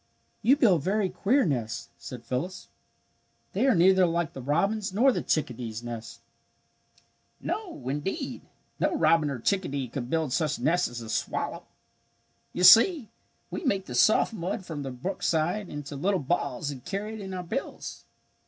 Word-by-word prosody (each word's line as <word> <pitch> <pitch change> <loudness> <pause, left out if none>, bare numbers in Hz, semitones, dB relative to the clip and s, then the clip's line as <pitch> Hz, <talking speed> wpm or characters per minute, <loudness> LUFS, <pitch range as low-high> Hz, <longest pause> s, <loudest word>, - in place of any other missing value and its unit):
"You 250 +6 +5
build 195 - +4
very 195 +4 +1
queer 255 +10 +2
nests," 120 -8 -2
said 125 -2 -9
Phyllis. 155 +9 -4 0.8
"They 270 - +2
are 260 - +5
neither 185 +1 +5
like 170 -1 -1
the 135 - -7
robin's 195 - 0
nor 245 +8 +4
the - - -1
chickadee's 120 -6 -2
nests." 115 -1 -7 1.2
"No, 365 - -5
indeed, 190 - -3 0.4
no - - +1
robin 165 -3 +3
or 140 - -3
chickadee 140 - -1
could 120 0 -5
build 160 -4 0
such 155 -2 0
nests 165 +8 +2
as 120 - -7
the 115 - -8
swallow. - - -3 0.8
You 180 - -2
see 230 - +7 0.4
we - - -4
make 200 - 0
the 125 - -7
soft 215 - +4
mud 185 -1 -4
from 155 -4 -5
the 135 - -4
brookside 170 +6 -1
into 145 0 -6
little 185 +7 +1
balls 140 -2 -1
and 130 -3 -9
carry 205 +3 -4
it 220 - -7
in 190 -1 -6
our 180 - -4
bills. 255 +10 -5
170 Hz, 160 wpm, -27 LUFS, 135-200 Hz, 1.2 s, see